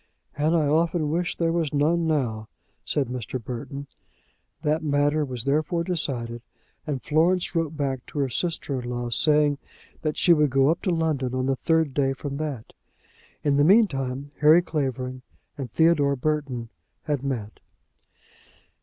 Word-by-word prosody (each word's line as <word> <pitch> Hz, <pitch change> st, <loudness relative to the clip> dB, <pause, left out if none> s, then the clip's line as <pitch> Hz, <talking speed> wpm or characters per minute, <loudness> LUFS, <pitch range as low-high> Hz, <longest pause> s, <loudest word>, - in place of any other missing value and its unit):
"And 155 Hz, +3 st, +1 dB
I 160 Hz, -3 st, +3 dB
often 160 Hz, +1 st, +1 dB
wish 170 Hz, +2 st, -1 dB
there 165 Hz, -1 st, +1 dB
was 165 Hz, -4 st, -1 dB
none 165 Hz, +3 st, +2 dB
now," 120 Hz, -8 st, -1 dB, 0.4 s
said 145 Hz, -, 0 dB
Mr. 125 Hz, 0 st, -4 dB
Burton. 125 Hz, +4 st, -6 dB, 0.8 s
That 155 Hz, +2 st, +1 dB
matter 145 Hz, +1 st, +2 dB
was 125 Hz, -5 st, -4 dB
therefore 155 Hz, +5 st, 0 dB
decided, 125 Hz, -10 st, -1 dB, 0.5 s
and 140 Hz, -4 st, -3 dB
Florence 170 Hz, +4 st, +2 dB
wrote 165 Hz, -2 st, -1 dB
back 135 Hz, -4 st, -2 dB
to -, -, -9 dB
her 140 Hz, -2 st, +1 dB
sister 140 Hz, -2 st, -2 dB
in 120 Hz, -, -6 dB
law, 120 Hz, -1 st, -3 dB
saying 150 Hz, +1 st, +3 dB, 0.4 s
that 155 Hz, -1 st, -2 dB
she 175 Hz, -, +5 dB
would 150 Hz, -2 st, +3 dB
go 135 Hz, +3 st, +4 dB
up 170 Hz, -, -2 dB
to -, -, -1 dB
London 155 Hz, -7 st, 0 dB
on 130 Hz, 0 st, 0 dB
the 135 Hz, 0 st, +1 dB
third 160 Hz, 0 st, +1 dB
day 135 Hz, -1 st, +1 dB
from 140 Hz, +1 st, -5 dB
that. 145 Hz, -7 st, -5 dB, 0.7 s
In 145 Hz, -2 st, +2 dB
the 145 Hz, -, +5 dB
meantime, 140 Hz, -, +2 dB
Harry 155 Hz, +4 st, +6 dB
Clavering 130 Hz, -5 st, -3 dB, 0.3 s
and 135 Hz, -5 st, -5 dB
Theodore 150 Hz, -1 st, +3 dB
Burton 135 Hz, -4 st, -2 dB, 0.3 s
had 145 Hz, -4 st, -1 dB
met. 120 Hz, -6 st, -4 dB
145 Hz, 155 wpm, -25 LUFS, 130-160 Hz, 0.8 s, Harry